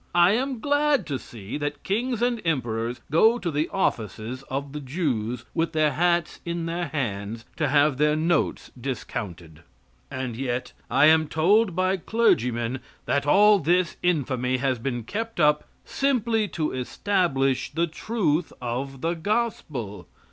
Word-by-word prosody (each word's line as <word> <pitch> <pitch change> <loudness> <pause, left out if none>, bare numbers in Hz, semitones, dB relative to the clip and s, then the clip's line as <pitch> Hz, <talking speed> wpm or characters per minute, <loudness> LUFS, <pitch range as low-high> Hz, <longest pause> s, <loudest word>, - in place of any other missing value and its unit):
I 175 +1 +6
am 255 +3 0
glad 290 - +2
to 140 -4 -3
see 115 +4 -7
that 145 -1 -4
kings 235 +3 -1
and 240 -2 +1
emperors 120 -7 -1
go 220 +9 +5
to 175 -8 -3
the 150 +2 0
offices 115 - -2
of 140 +1 -4
the 150 - -4
Jews, 125 -6 -2
with 165 0 0
their 155 -1 +3
hats 170 +3 +1
in 170 -1 -3
their 170 +1 -2
hands, 115 -5 -3
to 155 - +1
have 145 0 +3
their 150 0 +3
notes 160 +1 0
discounted. 95 - -6 0.5
And 130 -3 -4
yet 125 0 -3 0.2
I - - +5
am 155 0 +5
told 185 +5 +3
by 185 +1 +1
clergymen 125 - +1 0.3
that 140 0 0
all 205 +5 +6
this 175 +1 +1
infamy 130 -7 +1
has 130 -2 0
been 120 -1 -3
kept 225 - -4
up 150 -1 +3 0.2
simply 235 -6 +1
to 155 -5 -2
establish 135 -1 0
the 165 +3 0
truth 170 -2 -1
of 130 +2 -4
the 165 +1 0
gospel. 160 - -2
150 Hz, 150 wpm, -25 LUFS, 130-185 Hz, 0.5 s, I